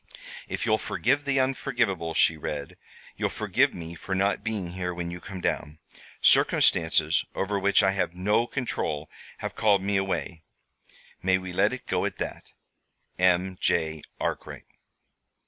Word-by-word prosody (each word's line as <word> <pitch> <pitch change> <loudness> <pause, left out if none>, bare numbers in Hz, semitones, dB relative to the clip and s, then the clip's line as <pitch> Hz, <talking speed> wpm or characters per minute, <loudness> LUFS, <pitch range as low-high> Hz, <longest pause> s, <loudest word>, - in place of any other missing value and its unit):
"If - - -3
you'll - - +3
forgive 145 0 0
the 140 -1 +2
unforgivable," 115 -11 0
she 80 - +4
read 75 -2 -5 0.4
"you'll - - 0
forgive - - +1
me 85 -1 -7
for 95 +3 -4
not 100 +2 +1
being 105 -6 -3
here 90 -1 -3
when 85 0 -4
you 90 0 -7
come 95 -3 -8
down. 75 -2 -2 0.5
'Circumstances 80 -1 +4
over 100 +1 -1
which 100 +1 +4
I 95 - +4
have 95 -3 -1
no 105 +6 +2
control 75 - -3 0.3
have - - -3
called 100 -3 +3
me 100 0 +1
away.' 95 -3 -2 0.8
May 95 +1 +3
we 95 -1 -7
let 100 +4 +3
it 130 - -6
go - - 0
at - - -3
that? - - -5 0.7
"M. 90 0 +2
J. 80 -2 +1 0.2
ARKWRIGHT." - - -4
95 Hz, 150 wpm, -27 LUFS, 85-100 Hz, 0.8 s, she